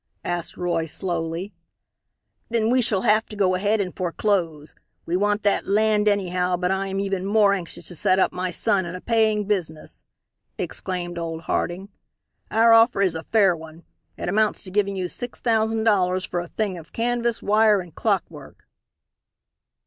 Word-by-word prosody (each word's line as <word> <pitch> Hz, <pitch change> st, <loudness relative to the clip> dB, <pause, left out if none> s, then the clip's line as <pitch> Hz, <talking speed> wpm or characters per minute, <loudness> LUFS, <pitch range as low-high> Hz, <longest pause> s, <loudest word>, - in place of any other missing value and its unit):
asked 175 Hz, -1 st, -3 dB
Roy, 170 Hz, -2 st, -1 dB
slowly. 170 Hz, +2 st, -3 dB, 1.0 s
"Then 230 Hz, -1 st, +1 dB
we 255 Hz, 0 st, +4 dB
shall 205 Hz, -5 st, 0 dB
have 220 Hz, -1 st, +3 dB
to 215 Hz, -, -9 dB
go 190 Hz, -3 st, +2 dB
ahead 205 Hz, +4 st, +1 dB
and 185 Hz, -3 st, -3 dB
foreclose. 170 Hz, -4 st, -1 dB, 0.3 s
We 170 Hz, -, -1 dB
want 205 Hz, +2 st, +1 dB
that 205 Hz, -, +1 dB
land 210 Hz, +1 st, +2 dB
anyhow, 180 Hz, -3 st, +1 dB
but 180 Hz, +1 st, 0 dB
I 195 Hz, +1 st, -1 dB
am 195 Hz, 0 st, -3 dB
even 195 Hz, -2 st, -2 dB
more 205 Hz, 0 st, +3 dB
anxious 180 Hz, -4 st, -5 dB
to 175 Hz, -, -6 dB
set 185 Hz, +2 st, +2 dB
up 190 Hz, -, +3 dB
my 180 Hz, 0 st, -2 dB
son 190 Hz, 0 st, 0 dB
in 170 Hz, -, -6 dB
a -, -, -6 dB
paying 220 Hz, -2 st, +1 dB
business," 175 Hz, -7 st, -4 dB, 0.5 s
exclaimed 175 Hz, -2 st, -4 dB
old 165 Hz, -1 st, -4 dB
Harding. 180 Hz, +4 st, -2 dB, 0.6 s
"Our 230 Hz, +1 st, +5 dB
offer 225 Hz, -3 st, +5 dB
is 185 Hz, -, +2 dB
a 160 Hz, -, -4 dB
fair 195 Hz, -1 st, +3 dB
one. 160 Hz, +1 st, -12 dB, 0.3 s
It -, -, -5 dB
amounts 215 Hz, +3 st, +1 dB
to 185 Hz, -, -9 dB
giving 200 Hz, 0 st, 0 dB
you 185 Hz, -1 st, -2 dB
six 245 Hz, +6 st, -7 dB
thousand 225 Hz, -1 st, +1 dB
dollars 185 Hz, -4 st, +2 dB
for 175 Hz, -, -3 dB
a 175 Hz, -, -5 dB
thing 195 Hz, -2 st, -3 dB
of 160 Hz, -, -15 dB
canvas, 235 Hz, 0 st, -1 dB
wire 215 Hz, 0 st, +4 dB
and 175 Hz, -3 st, -9 dB
clockwork." -, -, -3 dB
195 Hz, 170 wpm, -23 LUFS, 175-215 Hz, 1.0 s, Our